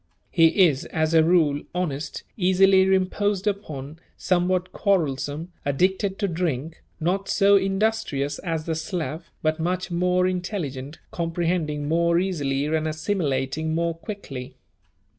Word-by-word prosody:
He 165 +2 +5
is, 150 +1 -2
as 160 0 -1
a 160 -1 +6
rule, 160 -4 +3
honest, 155 -5 -3
easily 190 0 +4
imposed 190 +1 +1
upon, 155 -8 -4 0.2
somewhat 185 0 +1
quarrelsome, 160 -3 -1
addicted 190 +7 +1
to 200 - 0
drink, 160 -3 -3 0.2
not 185 +4 -1
so 200 0 +5
industrious 195 -7 0
as 165 -3 -3
the 165 - -1
Slav 160 0 -4
but 155 +1 +1
much 180 +2 -2
more 180 +1 +2
intelligent, 170 -7 -3
comprehending 165 -3 -1
more 170 +2 +2
easily 145 -7 0
and 155 +1 0
assimilating 155 -2 -1
more 170 0 0
quickly. 165 - -8
170 Hz, 125 wpm, -24 LUFS, 155-185 Hz, 0.2 s, a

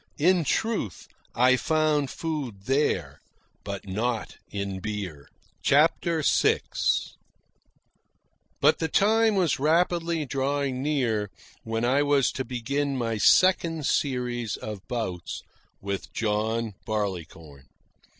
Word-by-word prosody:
In 175 +3 +3
truth, 195 - -1 0.3
I 125 +2 +5
found 155 0 +1
food 140 -12 -4
there, 135 +6 0 0.4
but 100 -1 -6
not 110 +4 -2
in 100 -2 -4
beer. 95 -8 -5 0.3
CHAPTER 160 +2 +3
VI - - +3 2.0
But - - +4
the 160 - 0
time 220 +5 +3
was 180 -8 +1
rapidly 165 +1 +1
drawing 135 0 -1
near 120 -8 0 0.3
when 115 +1 -2
I 135 +4 +3
was 145 -2 +3
to 130 - -3
begin 135 +3 -2
my 115 -3 -1
second 165 - +4
series 125 -6 -1
of 105 -3 -6
bouts 110 -9 -4 0.4
with 100 0 -4
John 110 +1 -1
Barleycorn. 85 -9 -5
130 Hz, 105 wpm, -26 LUFS, 105-150 Hz, 2.0 s, I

